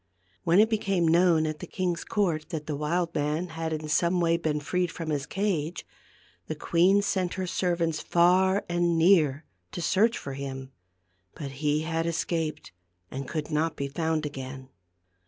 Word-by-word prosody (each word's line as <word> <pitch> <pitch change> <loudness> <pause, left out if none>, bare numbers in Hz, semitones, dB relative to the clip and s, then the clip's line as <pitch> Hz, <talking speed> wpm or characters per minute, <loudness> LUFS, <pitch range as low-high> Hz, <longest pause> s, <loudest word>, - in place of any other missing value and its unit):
When 170 +4 +4
it 215 - +6
became 195 -6 +1
known 165 -1 +4
at 155 -1 -3
the - - -7
king's 180 -2 -2
court 170 -7 -1
that 160 -4 -4
the 150 - -3
wild 165 +4 -1
man 150 +4 -1
had 160 0 -4
in 155 -1 -3
some 170 +4 +2
way 165 -1 +3
been 155 -3 -1
freed 180 +4 -1
from 165 -2 -5
his 145 -1 -2
cage, 180 -5 -2 0.6
the 155 - -3
queen 180 +6 +3
sent 185 -3 -1
her 190 - -2
servants 170 -3 0
far 185 +3 +3
and 175 -1 +1
near 160 -4 +4 0.3
to - - -4
search 215 +7 +2
for 140 - -6
him. 135 -1 -6 0.6
But 140 -3 -6
he 150 0 +2
had 165 +1 -1
escaped, 165 -2 -2 0.4
and 135 0 -5
could 155 -2 -4
not 155 +2 0
be 140 - -3
found 160 +1 -1
again. 130 -2 -7
165 Hz, 170 wpm, -27 LUFS, 150-180 Hz, 0.6 s, it